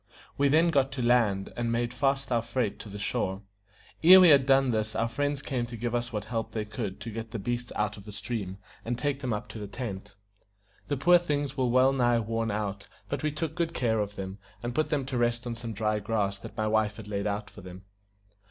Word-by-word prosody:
We 140 - +3
then 160 +4 +4
got 135 -3 +2
to 130 -3 -2
land, 110 -6 +2
and 120 -1 -1
made 120 +1 0
fast 135 0 0
our 120 -1 +3
freight 115 -2 -2
to 105 - -8
the 100 - -7
shore. 95 0 -2 0.6
Ere 185 +3 +10
we 180 -2 +8
had 140 -3 +6
done 135 -1 +4
this 110 -1 -1
our 115 - +1
friends 145 +4 -2
came 125 -3 -2
to 120 -1 -7
give 120 +1 -2
us 120 0 -1
what 105 -2 -3
help 115 0 -3
they 110 -2 -2
could 105 -3 -5
to 115 - -5
get 115 +1 -6
the 115 - -4
beasts 120 +3 -3
out 105 0 -1
of 100 - -12
the 105 - -8
stream, 100 -3 -4 0.3
and 120 +1 -2
take 145 0 -1
them 130 -3 -3
up 105 +1 -3
to 110 - -7
the 105 - -5
tent. 100 -3 -6 0.7
The 145 - -1
poor 175 +6 +6
things 145 -4 -2
were 130 -2 +1
well 130 +2 +4
nigh 120 -3 +3
worn 115 0 -1
out; 100 -2 -3 0.2
but - - -2
we 155 - 0
took 155 +1 -3
good 170 0 -2
care 110 -3 +1
of 105 0 -2
them, 95 +1 -6 0.2
and 120 0 -3
put 155 +5 0
them 145 -4 0
to 130 -2 -2
rest 120 0 +1
on 120 - -3
some 115 0 -6
dry 105 0 0
grass 100 -2 -1
that 110 - -10
my 110 - 0
wife 110 -1 +1
had 110 -2 -9
laid 100 0 -2
out 105 0 -3
for 100 - -12
them. 90 +1 -10
115 Hz, 245 wpm, -28 LUFS, 105-135 Hz, 0.7 s, Ere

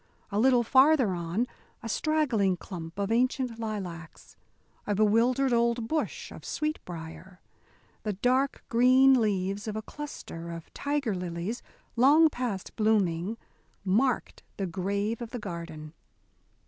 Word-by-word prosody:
A 200 - 0
little 250 0 +5
farther 265 -1 +5
on, 175 +6 -1 0.4
a - - -4
straggling 230 - +1
clump 170 -2 -8
of 200 +1 -1
ancient 250 0 +1
lilacs, 185 -7 -6 0.5
a 205 - +1
bewildered 235 +5 +3
old 235 -1 +1
bush 315 +4 -2
of - - -10
sweetbrier, 180 - -5 0.6
the 210 - -2
dark 255 +7 +1
green 255 +2 +5
leaves 200 0 -1
of 215 - -3
a 220 - -4
cluster 205 - -8
of 165 -1 -8
tiger 285 -6 -1
lilies, 180 +5 -4 0.3
long 295 +6 +6
past 235 -8 -4
blooming, 210 -2 +1 0.5
marked 230 +7 +1 0.2
the 195 - -1
grave 200 +5 -2
of 235 - -5
the 245 - -5
garden. 170 -6 -7
220 Hz, 125 wpm, -28 LUFS, 185-255 Hz, 0.6 s, long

